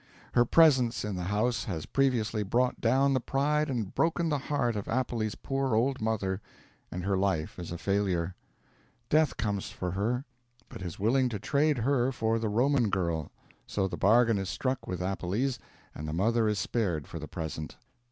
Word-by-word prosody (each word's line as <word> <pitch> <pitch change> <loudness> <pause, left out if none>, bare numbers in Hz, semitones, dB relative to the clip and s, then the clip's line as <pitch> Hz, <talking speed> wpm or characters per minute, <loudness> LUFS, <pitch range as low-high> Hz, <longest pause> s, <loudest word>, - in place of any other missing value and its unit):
Her 120 0 +5
presence 130 -7 +4
in 105 -2 -3
the 90 -1 -3
house 110 +5 0
has 85 -7 -4
previously 120 -5 +1
brought 120 +5 0
down 135 +4 +3
the 130 - +2
pride 150 +4 0
and 115 -7 -2
broken 165 0 +1
the 145 -2 +1
heart 125 -4 0
of 105 - -4
Appelles' 115 -3 -1
poor 135 -3 -1
old 130 +3 +1
mother; 105 -3 -1 0.5
and 90 - -4
her 100 +1 +1
life 95 -4 -1
is 85 - -6
a 85 - -4
failure. 95 -3 0 0.8
Death 155 -2 +3
comes 100 -3 -2
for 90 -1 -4
her, 115 +8 -1 0.4
but - - -9
is 85 -3 -5
willing 125 +5 +2
to 110 - -3
trade 145 +7 +1
her 125 +1 +2
for 115 -2 0
the 110 -1 -1
Roman 120 +1 +2
girl; 85 -6 -1 0.4
so 95 -2 0
the - - -4
bargain 115 +1 +4
is 95 -1 -3
struck 130 +5 -2
with 90 -1 -3
Appelles, 100 +8 -1 0.3
and 75 - -6
the 75 - -3
mother 110 +6 +2
is 105 -1 +1
spared 90 - -1
for - - -7
the - - -7
present. 80 -1 -5
110 Hz, 180 wpm, -29 LUFS, 95-130 Hz, 0.8 s, Her